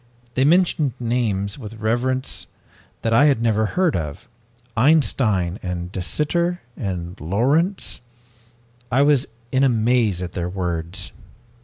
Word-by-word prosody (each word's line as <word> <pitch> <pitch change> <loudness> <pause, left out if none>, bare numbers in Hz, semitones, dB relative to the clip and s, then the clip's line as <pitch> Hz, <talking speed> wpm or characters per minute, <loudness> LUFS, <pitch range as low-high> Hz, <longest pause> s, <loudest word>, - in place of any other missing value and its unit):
They 130 +2 +2
mentioned 160 -4 +3
names 115 -4 -1
with 110 -3 -8
reverence 120 +4 -1 0.6
that 115 - +1
I 140 +6 +6
had 140 -6 +4
never 110 -2 +2
heard 180 -3 +3 0.8
Einstein 110 - +2
and 90 -1 -4
De 95 - -4
Sitter 170 - 0 0.2
and 90 -4 -4
Lorentz. 140 - +1 0.9
I 135 +4 +4
was 145 -3 +3 0.2
in 130 0 +3
a 135 - +5
maze 115 -4 +2
at 90 -1 -4
their 90 -1 -3
words. 90 -1 -3
115 Hz, 125 wpm, -22 LUFS, 95-140 Hz, 0.9 s, I